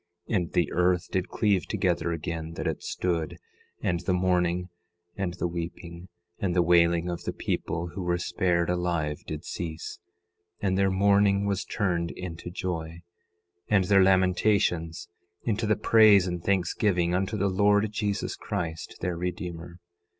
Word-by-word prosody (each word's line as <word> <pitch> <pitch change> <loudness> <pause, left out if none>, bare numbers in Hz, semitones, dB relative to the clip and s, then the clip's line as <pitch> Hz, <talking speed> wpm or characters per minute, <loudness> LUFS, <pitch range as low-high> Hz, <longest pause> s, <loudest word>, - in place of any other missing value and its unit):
10:10 - - +2
And 90 -4 0
the 85 - +1
earth 90 0 +2
did 95 -1 -1
cleave 100 -6 +1
together 85 - 0
again, 80 0 -4
that - - -5
it - - -2
stood; 85 -4 -2 0.5
and 85 -1 +1
the 90 +1 0
mourning, 90 0 +1 0.5
and 95 -3 -3
the 90 - -1
weeping, 85 +1 -6 0.3
and 90 -3 -1
the 90 - +4
wailing 85 0 +4
of 85 -1 -4
the - - -1
people 85 +1 -3
who 95 - -6
were 90 -1 0
spared 90 -1 0
alive 85 -4 -1
did 75 -1 -5
cease; 80 -2 -5 0.6
and 95 -2 0
their 95 0 +3
mourning 100 +1 +3
was 100 0 0
turned 85 -4 -1
into 90 -1 -6
joy, 85 -2 -4 0.6
and 100 -3 +3
their 95 +1 +5
lamentations 95 -3 +2 0.4
into 110 -1 -1
the 105 - +3
praise 105 -3 +6
and 90 -2 -4
thanksgiving 90 -2 +1
unto 95 +4 0
the 100 0 +1
Lord 105 +2 +3
Jesus 105 -1 -2
Christ, 85 -6 -5
their 90 -1 -1
Redeemer. 85 -1 -5
90 Hz, 150 wpm, -27 LUFS, 85-100 Hz, 0.6 s, praise